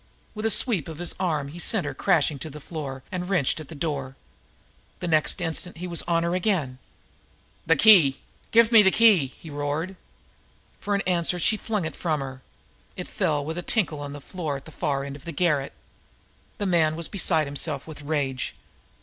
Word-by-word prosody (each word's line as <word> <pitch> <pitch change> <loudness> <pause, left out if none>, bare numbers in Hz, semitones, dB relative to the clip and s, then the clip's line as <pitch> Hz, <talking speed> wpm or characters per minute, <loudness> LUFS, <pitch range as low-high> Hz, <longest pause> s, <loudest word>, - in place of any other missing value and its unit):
With 215 +1 -1
a - - +2
sweep 210 - +2
of 160 -2 -7
his 175 +1 -2
arm 155 -7 -1
he 165 +4 -9
sent 215 +2 0
her - - -3
crashing 155 -6 +2
to 155 - -6
the 150 +1 -9
floor, 140 -4 -6
and 180 0 -4
wrenched 160 -7 +1
at 155 - -8
the 160 - -10
door. 140 -3 -3 0.8
The 175 - -4
next 155 +2 +2
instant 175 +1 -3
he 180 - -5
was 170 -2 -2
on 170 -1 +2
her 170 +1 0
again. 175 -9 0 0.9
"The 165 - +5
key! 165 -7 +6 0.3
Give 230 0 +5
me 225 -2 +9
that 190 -2 +3
key!" 210 -11 +6
he 155 +4 -13
roared. 145 +6 -2 0.8
For 205 -1 0
answer 180 -1 +1
she 180 +5 +2
flung 210 -4 -2
it 160 - -5
from 155 -4 -1
her. 135 -1 -6 0.6
It - - -5
fell 145 -2 0
with 160 +3 -3
a - - -3
tinkle 175 -6 0
on 145 -1 -6
the 145 - -7
floor 155 -3 -4
at 135 - -13
the 160 - -11
far 140 -2 -1
end 140 0 -6
of 140 - -12
the 170 - -4
garret. 150 -4 +1 0.9
The 205 - -2
man 165 -4 +3
was 165 0 -3
beside 165 -5 +1
himself 140 0 -3
with 155 -2 -10
rage. 140 -3 -2
160 Hz, 200 wpm, -25 LUFS, 145-180 Hz, 0.9 s, me